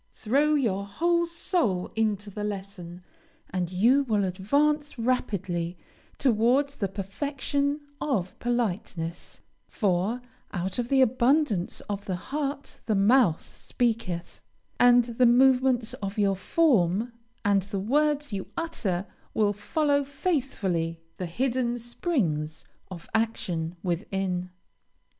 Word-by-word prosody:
Throw 285 Hz, +7 st, +2 dB
your 200 Hz, -8 st, 0 dB
whole 340 Hz, +10 st, +1 dB
soul 335 Hz, -, 0 dB
into 210 Hz, -2 st, 0 dB
the 210 Hz, +1 st, -5 dB
lesson, 190 Hz, -4 st, -6 dB, 0.5 s
and 180 Hz, -1 st, -2 dB
you 235 Hz, +10 st, +4 dB
will 210 Hz, -4 st, +1 dB
advance 285 Hz, +11 st, +1 dB
rapidly 195 Hz, -8 st, -1 dB, 0.4 s
towards 260 Hz, +3 st, +2 dB
the 200 Hz, -, 0 dB
perfection 280 Hz, +8 st, -2 dB, 0.2 s
of 205 Hz, -11 st, -1 dB
politeness, 190 Hz, -8 st, -3 dB, 0.3 s
for 200 Hz, +3 st, 0 dB, 0.3 s
"out 185 Hz, +3 st, -3 dB
of 240 Hz, -, -1 dB
the 270 Hz, -1 st, +4 dB
abundance 255 Hz, -, +1 dB
of 200 Hz, -1 st, -5 dB
the 185 Hz, -, -2 dB
heart 280 Hz, +7 st, -4 dB
the 215 Hz, -, +2 dB
mouth 200 Hz, -3 st, +4 dB
speaketh," 225 Hz, -8 st, -2 dB, 0.4 s
and 245 Hz, 0 st, +7 dB
the 235 Hz, +1 st, +2 dB
movements 250 Hz, -1 st, +4 dB
of 195 Hz, +2 st, -4 dB
your 200 Hz, -2 st, +3 dB
form 220 Hz, -, +2 dB, 0.3 s
and 200 Hz, -1 st, +4 dB
the 200 Hz, +1 st, -4 dB
words 290 Hz, +4 st, +1 dB
you 195 Hz, -1 st, -3 dB
utter 205 Hz, -, -1 dB, 0.3 s
will 210 Hz, -2 st, +3 dB
follow 285 Hz, +7 st, +1 dB
faithfully 250 Hz, -, -1 dB, 0.2 s
the 180 Hz, -, -3 dB
hidden 245 Hz, +5 st, 0 dB
springs 220 Hz, -, -2 dB, 0.2 s
of 175 Hz, -3 st, -9 dB
action 180 Hz, -7 st, -1 dB
within. 180 Hz, 0 st, -2 dB
220 Hz, 115 wpm, -27 LUFS, 190-265 Hz, 0.5 s, and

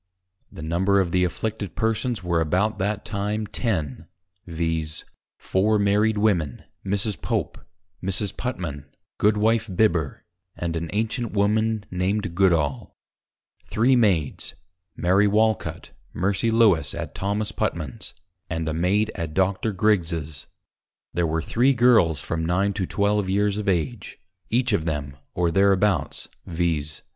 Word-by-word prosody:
_ -, -, -16 dB
The 80 Hz, -, -7 dB
Number 95 Hz, +5 st, +2 dB
of 90 Hz, -3 st, 0 dB
the 90 Hz, 0 st, +2 dB
Afflicted 105 Hz, +3 st, -3 dB
Persons 110 Hz, -1 st, -1 dB
were 85 Hz, -2 st, +1 dB
about 95 Hz, +7 st, 0 dB
that 100 Hz, +2 st, -1 dB
time 105 Hz, +1 st, -2 dB
Ten, 85 Hz, -, -2 dB, 0.4 s
viz. 80 Hz, -2 st, -3 dB, 0.3 s
Four 105 Hz, +3 st, +1 dB
Married 105 Hz, +2 st, +2 dB
Women, 90 Hz, -, +1 dB, 0.2 s
Mrs. 100 Hz, +2 st, -1 dB
Pope, -, -, -2 dB, 0.4 s
Mrs. 95 Hz, +2 st, -1 dB
Putman, 85 Hz, -, -4 dB, 0.3 s
Goodwife 110 Hz, +1 st, +2 dB
Bibber, 85 Hz, -9 st, +1 dB, 0.3 s
and 85 Hz, -1 st, -3 dB
an 85 Hz, 0 st, -3 dB
Ancient 115 Hz, +2 st, -2 dB
Woman, 110 Hz, +1 st, +1 dB
named 95 Hz, +1 st, -1 dB
Goodall; 85 Hz, -8 st, +1 dB, 0.7 s
three 125 Hz, +4 st, +3 dB
Maids, 95 Hz, -, +1 dB, 0.4 s
Mary 95 Hz, +4 st, +3 dB
Walcut, 110 Hz, +1 st, 0 dB, 0.2 s
Mercy 100 Hz, +4 st, 0 dB
Lewes, 105 Hz, -11 st, +3 dB
at -, -, -5 dB
Thomas 105 Hz, +2 st, -1 dB
Putman's, 75 Hz, -9 st, -3 dB, 0.3 s
and 80 Hz, -2 st, -2 dB
a 80 Hz, -, -1 dB
Maid 100 Hz, +7 st, +1 dB
at 80 Hz, -3 st, -5 dB
Dr. 95 Hz, +3 st, +1 dB
Griggs's; 85 Hz, -8 st, 0 dB, 0.7 s
there 85 Hz, 0 st, +1 dB
were 80 Hz, +1 st, -1 dB
three 130 Hz, +8 st, +2 dB
Girls 115 Hz, -, +4 dB
from 80 Hz, +4 st, -3 dB
9 95 Hz, +4 st, +1 dB
to 95 Hz, -3 st, -2 dB
12 100 Hz, -1 st, +1 dB
Years 100 Hz, +1 st, +1 dB
of 105 Hz, -, -1 dB
Age, 95 Hz, +6 st, -2 dB, 0.3 s
each 120 Hz, 0 st, +1 dB
of 80 Hz, -6 st, +1 dB
them, 75 Hz, -3 st, -3 dB, 0.2 s
or 85 Hz, -1 st, +1 dB
thereabouts, 100 Hz, +1 st, +2 dB, 0.2 s
_viz. 80 Hz, -3 st, -1 dB
95 Hz, 135 wpm, -24 LUFS, 85-105 Hz, 0.7 s, Girls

